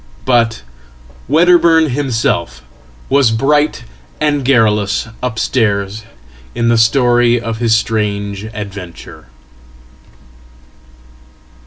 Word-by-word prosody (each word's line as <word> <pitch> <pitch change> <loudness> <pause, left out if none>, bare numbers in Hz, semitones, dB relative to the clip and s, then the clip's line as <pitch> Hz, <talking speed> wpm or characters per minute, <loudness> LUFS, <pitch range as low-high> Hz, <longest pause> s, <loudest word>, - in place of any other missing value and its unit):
ButWedderburn 165 0 +4
himself 115 - -2 0.4
was 140 -3 +3
bright 145 +7 0 0.4
and 145 -2 0
garrulous 110 -5 +1
upstairs 110 -4 -1 0.5
in 115 0 0
the 115 -1 +4
glory 120 -2 +2
of 115 -1 -5
hisstrange 105 -3 -1
adventure. 100 - -9
115 Hz, 65 wpm, -14 LUFS, 105-135 Hz, 0.5 s, ButWedderburn